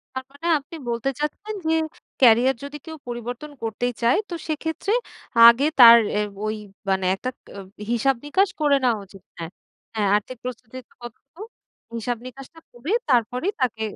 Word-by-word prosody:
তার 260 Hz, -, -4 dB
মানে 285 Hz, +4 st, -8 dB
আপনি 310 Hz, +4 st, -12 dB
বলতে 235 Hz, +3 st, -1 dB
চাচ্ছেন, 415 Hz, +9 st, -4 dB
যে, 320 Hz, -, +3 dB, 0.5 s
ক্যারিয়ার 250 Hz, +2 st, +5 dB
যদি 285 Hz, +1 st, -7 dB
কেউ 320 Hz, 0 st, -7 dB
পরিবর্তন 245 Hz, +5 st, -6 dB
করতেই 235 Hz, +2 st, -2 dB
চায়। 235 Hz, +9 st, +4 dB
তো 345 Hz, -, -5 dB
সেক্ষেত্রে 320 Hz, +6 st, -2 dB, 0.5 s
আগে 235 Hz, +4 st, +7 dB, 0.2 s
তার 235 Hz, -1 st, +11 dB, 0.2 s
এ -, -, +2 dB, 0.3 s
ওই 215 Hz, 0 st, -2 dB, 0.3 s
মানে 190 Hz, -1 st, +1 dB
একটা 255 Hz, +6 st, -5 dB, 0.2 s
ক -, -, -65 dB
অ -, -, -5 dB, 0.3 s
হিসাব 270 Hz, +3 st, +2 dB
নিকাশ 385 Hz, +6 st, +2 dB
করে 290 Hz, -2 st, +4 dB
নেওয়া 235 Hz, -4 st, +2 dB
উচিত 195 Hz, -1 st, -16 dB, 0.2 s
হ্যাঁ, 165 Hz, 0 st, -6 dB, 0.4 s
হ্যাঁ, 210 Hz, -2 st, +1 dB
আর্থিক 230 Hz, +5 st, -5 dB
প্রস্তুতিটা 250 Hz, 0 st, -8 dB
কতটুকু 275 Hz, -, -12 dB, 0.5 s
হিসাব 240 Hz, +1 st, -2 dB
নিকাশটা 275 Hz, +6 st, -12 dB
করে 255 Hz, -, -5 dB, 0.2 s
তারপরেই 250 Hz, -, +1 dB
তাকে 225 Hz, -3 st, -1 dB
250 Hz, 160 wpm, -23 LUFS, 230-295 Hz, 0.5 s, তার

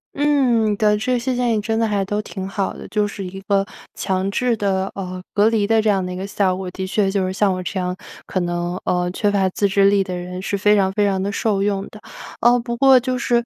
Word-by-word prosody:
嗯， 255 Hz, -7 st, +2 dB
对， 210 Hz, 0 st, +3 dB
这 245 Hz, +3 st, 0 dB
些 250 Hz, +2 st, -2 dB
建 245 Hz, -1 st, +1 dB
议 210 Hz, -, 0 dB
真 225 Hz, +1 st, -1 dB
的 225 Hz, -, +2 dB
还 205 Hz, -2 st, 0 dB
都 205 Hz, +2 st, -2 dB
挺 190 Hz, -2 st, -6 dB
好 195 Hz, 0 st, -2 dB
的， -, -, -10 dB
就 210 Hz, -1 st, 0 dB
是 200 Hz, -1 st, -7 dB
一 190 Hz, +1 st, -7 dB
个 195 Hz, 0 st, +1 dB, 0.3 s
强 190 Hz, 0 st, -1 dB
制 245 Hz, +2 st, +1 dB
的， 195 Hz, -2 st, 0 dB
呃， 185 Hz, -2 st, -5 dB
隔 210 Hz, +1 st, +4 dB
离 215 Hz, -3 st, +1 dB
的 225 Hz, 0 st, +3 dB
这 215 Hz, -, +1 dB
样 195 Hz, -2 st, +2 dB
的 180 Hz, -, -4 dB
一 -, -, -6 dB
个 190 Hz, +1 st, -4 dB
效 195 Hz, -2 st, 0 dB
果。 185 Hz, 0 st, -5 dB
的 190 Hz, +1 st, -5 dB
确 195 Hz, 0 st, +1 dB
就 195 Hz, -1 st, 0 dB
是 185 Hz, -, -2 dB
像 195 Hz, 0 st, +2 dB
我 185 Hz, -, -3 dB
这 185 Hz, +1 st, -3 dB
样 180 Hz, 0 st, -2 dB, 0.3 s
可 185 Hz, -, -2 dB
能， 175 Hz, +1 st, -2 dB
呃， 180 Hz, 0 st, 0 dB
缺 205 Hz, +3 st, 0 dB
乏 200 Hz, -2 st, +2 dB
自 200 Hz, +2 st, 0 dB
制 195 Hz, 0 st, +3 dB
力 200 Hz, -1 st, +3 dB
的 185 Hz, -1 st, -5 dB
人 180 Hz, +1 st, -6 dB
是 200 Hz, +1 st, -2 dB
非 210 Hz, +2 st, +4 dB
常 190 Hz, -2 st, +2 dB
非 205 Hz, 0 st, +2 dB
常 195 Hz, -2 st, 0 dB
的 200 Hz, +1 st, -1 dB
受 200 Hz, -1 st, 0 dB
用 200 Hz, -1 st, 0 dB
的。 215 Hz, -, -13 dB, 0.4 s
哦 240 Hz, +1 st, +5 dB
不 235 Hz, 0 st, -4 dB
过 265 Hz, 0 st, +6 dB
就 255 Hz, +1 st, -2 dB
是 240 Hz, -1 st, +1 dB
200 Hz, 280 characters per minute, -20 LUFS, 190-220 Hz, 0.4 s, 过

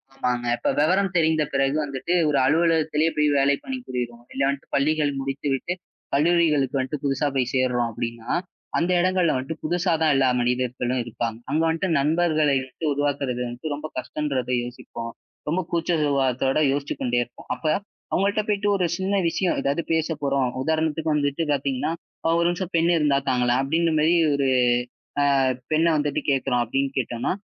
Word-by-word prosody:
ஆமாங்க. 125 Hz, -2 st, -1 dB
இப்ப -, -, -1 dB
விவரம் 185 Hz, +5 st, +2 dB
தெரிந்த 160 Hz, -1 st, +3 dB
பிறகு 135 Hz, +1 st, +2 dB
வந்துட்டு 140 Hz, +5 st, -3 dB, 0.2 s
ஒரு 140 Hz, -, +2 dB
அலுவலகத்திலே 160 Hz, 0 st, +2 dB
போய் 150 Hz, 0 st, +3 dB
வேலை 140 Hz, +1 st, +3 dB
பண்ணி 265 Hz, -1 st, -4 dB
புரிறோம். 120 Hz, -1 st, -4 dB
இல்ல, 135 Hz, -, -3 dB
வந்துட்டு 140 Hz, 0 st, -3 dB
பள்ளிகள் 150 Hz, +1 st, +2 dB
முடித்துவிட்டு 135 Hz, +4 st, -2 dB, 0.4 s
கல்லூரிகளுக்கு 150 Hz, -3 st, +2 dB
வந்துட்டு 135 Hz, +2 st, -3 dB
புதுசா 140 Hz, +1 st, +1 dB
போய் 125 Hz, -2 st, 0 dB
சேர்றோம் 125 Hz, -2 st, +1 dB
அப்படின்னா, 115 Hz, +1 st, -5 dB, 0.5 s
அந்த 175 Hz, +2 st, +1 dB
இடங்கள்ல 185 Hz, -2 st, +2 dB
வந்துட்டு 135 Hz, +5 st, -3 dB
புதுசாதான் 165 Hz, -3 st, +2 dB
எல்லா 135 Hz, -1 st, +3 dB
மனிதர்களும் 125 Hz, 0 st, 0 dB
இருப்பாங்க. 115 Hz, -1 st, -4 dB
அங்க 155 Hz, -, +2 dB
வந்துட்டு 165 Hz, +3 st, 0 dB
நண்பர்களை 155 Hz, -1 st, +2 dB
எப்படி 130 Hz, +5 st, -6 dB
உருவாக்கறது 140 Hz, -3 st, -1 dB
வந்துட்டு 125 Hz, +5 st, -5 dB
ரொம்ப 150 Hz, +2 st, -6 dB
கஷ்டன்றத 130 Hz, -1 st, -2 dB
யோசிப்போம். 115 Hz, -1 st, -7 dB, 0.4 s
ரொம்ப 180 Hz, +4 st, +1 dB
கூச்ச 170 Hz, +1 st, 0 dB
சுபாவத்தோட 135 Hz, -1 st, +1 dB
யோசிச்சு 140 Hz, +1 st, -2 dB
கொண்டே 120 Hz, -1 st, +1 dB
இருப்போம். 120 Hz, -, -16 dB
அப்ப 160 Hz, -, -14 dB, 0.5 s
அவங்க 195 Hz, -, +2 dB
கிட்ட 215 Hz, +1 st, 0 dB
போயிட்டு, 205 Hz, -1 st, 0 dB
ஒரு 185 Hz, -3 st, +1 dB
சின்ன 195 Hz, +1 st, -1 dB
விஷயம் 180 Hz, +1 st, 0 dB
ஏதாவது 140 Hz, +5 st, 0 dB
பேசப்போறோம். 145 Hz, -4 st, 0 dB, 0.2 s
உதாரணத்துக்கு 160 Hz, +1 st, 0 dB
வந்துட்டு 145 Hz, +2 st, 0 dB
பாத்தீங்கன்னா, 140 Hz, +2 st, -1 dB, 0.5 s
"ஒரு 170 Hz, -, +2 dB
நிமிஷம் 175 Hz, +1 st, -3 dB
பெண் 165 Hz, +1 st, +3 dB
இருந்தா 150 Hz, -3 st, +3 dB
தாங்களேன்" 125 Hz, 0 st, +2 dB
அப்படின்னு 165 Hz, +4 st, +1 dB
மாதிரி 165 Hz, +3 st, +4 dB, 0.2 s
ஒரு 140 Hz, -1 st, +1 dB, 1.0 s
ஆ, -, -, +2 dB, 0.3 s
பெண்ண 160 Hz, +2 st, +3 dB
வந்துட்டு 145 Hz, -1 st, 0 dB
கேட்கிறோம் 130 Hz, -3 st, +1 dB
அப்படின்னு 135 Hz, +4 st, -1 dB
கேட்டோம்னா, 120 Hz, +2 st, -1 dB
145 Hz, 155 wpm, -24 LUFS, 130-160 Hz, 1.0 s, மாதிரி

